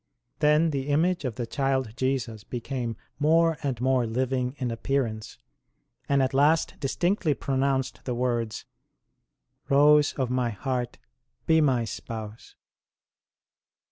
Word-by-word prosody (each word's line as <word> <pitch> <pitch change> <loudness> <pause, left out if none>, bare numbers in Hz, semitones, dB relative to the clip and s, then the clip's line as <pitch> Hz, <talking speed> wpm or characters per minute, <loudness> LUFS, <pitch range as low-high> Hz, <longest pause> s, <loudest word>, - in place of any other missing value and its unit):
Then 150 +2 +4
the 135 -1 -3
image 160 +3 +1
of 125 -4 -3
the 120 - -3
Child 130 -2 -1
Jesus 125 -5 -2
became 120 -1 -4 0.2
more 165 +1 +3
and 135 -5 -2
more 130 -1 +2
living 125 +2 -1
in 125 -3 -2
appearance, 115 -2 -2 0.7
and 140 -1 +3
at 130 - -1
last 150 +4 +3
distinctly 170 +2 0
pronounced 135 -2 -1
the 125 - -2
words: 120 -3 -2 0.5
" 130 +3 -44
Rose 145 +1 +5
of 130 -3 -2
My 125 -1 +1
heart, 125 +2 -3 0.5
be 160 0 +4
My 130 -6 +2
Spouse." 110 0 -8
130 Hz, 125 wpm, -26 LUFS, 120-145 Hz, 0.7 s, Rose